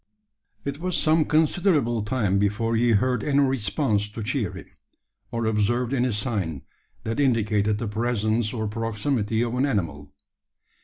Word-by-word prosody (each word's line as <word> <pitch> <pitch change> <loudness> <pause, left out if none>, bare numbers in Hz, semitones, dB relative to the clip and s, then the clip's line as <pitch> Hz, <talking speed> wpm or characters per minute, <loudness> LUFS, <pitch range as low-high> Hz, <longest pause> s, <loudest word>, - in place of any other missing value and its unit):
It 140 +1 -4
was 180 0 -1
some 155 0 +3
considerable 155 - +2
time 105 -3 0
before 105 +3 0
he 120 +1 +3
heard 125 +3 +1
any 145 -1 +2
response 125 -4 +1
to 110 +1 -6
cheer 115 -3 -1
him, - - -9 0.6
or 115 -2 -2
observed 115 +4 +1
any 125 -1 +1
sign 100 - -2 0.4
that 115 +4 -3
indicated 110 -5 +2
the 115 - -3
presence 110 0 0
or 110 -3 -2
proximity 115 +1 -1
of 120 -1 -2
an 130 +3 +1
animal. 80 - -3
115 Hz, 145 wpm, -25 LUFS, 105-130 Hz, 0.6 s, some